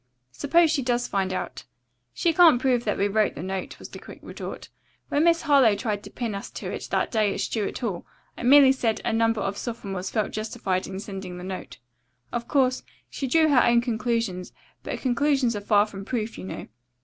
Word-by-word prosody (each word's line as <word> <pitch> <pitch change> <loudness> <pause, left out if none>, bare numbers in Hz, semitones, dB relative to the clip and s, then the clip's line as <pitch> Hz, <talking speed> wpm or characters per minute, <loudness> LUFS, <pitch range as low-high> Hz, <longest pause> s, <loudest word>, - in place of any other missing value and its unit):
"Suppose 325 - +3
she 305 -4 +1
does 245 -1 0
find 190 -1 -1
out?" 185 - -5 0.5
"She 340 -2 +1
can't 320 -7 +6
prove 250 -2 +1
that 210 - 0
we 200 - +2
wrote 215 +1 +1
the 150 - -6
note," 190 0 -4
was - - -10
the - - -10
quick - - -12
retort. - - -7 0.4
"When 290 - +2
Miss 335 0 +3
Harlowe 275 -8 +5
tried 210 -2 -2
to - - -10
pin 235 -4 -4
us 200 - -6
to - - -6
it - - -5
that - - 0
day 215 -3 +1
at - - -5
Stuart 215 -3 -2
Hall 200 -8 -4 0.3
I - - -9
merely 270 +2 +7
said 235 -4 0
that - - -6
a - - -1
number 225 -1 +2
of 195 +1 -3
sophomores 195 -6 -5
felt 215 -3 -1
justified 195 -4 -2
in 190 0 -6
sending 195 -3 -7
the 180 - -8
note. 185 0 -7 0.5
Of 235 -1 -3
course, 260 -3 +2 0.3
she 270 - -3
drew 315 +4 +4
her 260 -4 +5
own 235 0 +4
conclusions, 230 -6 -2 0.3
but - - -5
conclusions 265 -2 +1
are 205 - -4
far 205 0 +4
from 200 -2 -9
proof, 225 0 -3
you - - -8
know. - - -7
230 Hz, 210 wpm, -25 LUFS, 200-260 Hz, 0.5 s, merely